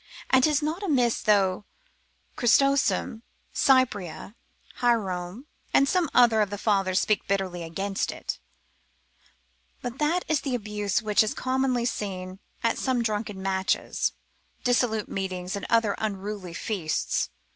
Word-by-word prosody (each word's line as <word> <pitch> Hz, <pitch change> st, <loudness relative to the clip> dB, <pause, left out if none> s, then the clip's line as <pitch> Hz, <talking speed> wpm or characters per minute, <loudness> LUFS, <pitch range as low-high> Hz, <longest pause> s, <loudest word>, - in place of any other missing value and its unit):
And 260 Hz, -1 st, +5 dB
'tis 300 Hz, 0 st, +3 dB
not 315 Hz, +5 st, -2 dB
amiss, 255 Hz, -, +1 dB
though 200 Hz, -2 st, +2 dB, 0.7 s
Chrysostom, 240 Hz, -3 st, +2 dB, 0.3 s
Cyprian, 255 Hz, -, +1 dB, 0.4 s
Hierome, 205 Hz, -2 st, -1 dB, 0.3 s
and 275 Hz, -, +5 dB
some 355 Hz, -1 st, +1 dB
other 230 Hz, -3 st, +5 dB
of 205 Hz, -, +1 dB
the 205 Hz, -, -4 dB
fathers 195 Hz, -3 st, +2 dB
speak 215 Hz, -, 0 dB
bitterly 190 Hz, -3 st, -1 dB
against 195 Hz, +4 st, -2 dB
it: -, -, -5 dB, 1.4 s
but 245 Hz, +1 st, -5 dB
that 325 Hz, +4 st, +1 dB
is 310 Hz, -2 st, +1 dB
the 270 Hz, -4 st, -2 dB
abuse 210 Hz, -1 st, -2 dB
which 210 Hz, -1 st, +3 dB
is 215 Hz, -, 0 dB
commonly 255 Hz, -2 st, 0 dB
seen 190 Hz, -5 st, -4 dB, 0.2 s
at 230 Hz, -, +1 dB
some 255 Hz, -3 st, 0 dB
drunken 210 Hz, -3 st, -3 dB
matches, 190 Hz, 0 st, 0 dB, 0.5 s
dissolute 240 Hz, -3 st, +1 dB
meetings, 185 Hz, -1 st, -4 dB
or -, -, -2 dB
great 225 Hz, 0 st, +2 dB
unruly 200 Hz, -4 st, -4 dB
feasts. 180 Hz, -7 st, -1 dB
215 Hz, 125 wpm, -26 LUFS, 195-250 Hz, 1.4 s, And